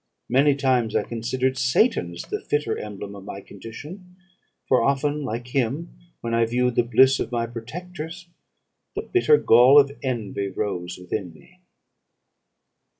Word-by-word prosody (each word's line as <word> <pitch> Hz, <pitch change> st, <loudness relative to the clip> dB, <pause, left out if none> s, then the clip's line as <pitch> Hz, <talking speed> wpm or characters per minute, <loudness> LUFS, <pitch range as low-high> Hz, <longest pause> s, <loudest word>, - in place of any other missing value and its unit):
Many 140 Hz, +3 st, +4 dB
times 130 Hz, -5 st, +1 dB
I -, -, +2 dB
considered 130 Hz, +3 st, -2 dB
Satan 125 Hz, -, +2 dB
as 85 Hz, -, -6 dB
the -, -, -5 dB
fitter 145 Hz, -6 st, -1 dB
emblem 100 Hz, -1 st, -7 dB
of 100 Hz, -, -10 dB
my 100 Hz, -, -7 dB
condition; 150 Hz, -, -11 dB, 0.5 s
for 130 Hz, -, +4 dB
often, 145 Hz, +3 st, +1 dB
like 120 Hz, -1 st, -5 dB
him, 135 Hz, +6 st, -2 dB, 0.3 s
when 115 Hz, 0 st, -3 dB
I 115 Hz, 0 st, +3 dB
viewed 125 Hz, +1 st, +1 dB
the 120 Hz, -, +3 dB
bliss 130 Hz, +3 st, +4 dB
of -, -, -3 dB
my 120 Hz, -1 st, 0 dB
protectors, 165 Hz, +9 st, -8 dB, 0.7 s
the -, -, -3 dB
bitter 445 Hz, +5 st, +4 dB
gall 125 Hz, -, +7 dB
of 140 Hz, -1 st, +3 dB
envy 110 Hz, -6 st, -3 dB
rose 95 Hz, -3 st, -4 dB
within 90 Hz, 0 st, -5 dB
me. 180 Hz, -, -20 dB
125 Hz, 150 wpm, -24 LUFS, 115-145 Hz, 0.7 s, gall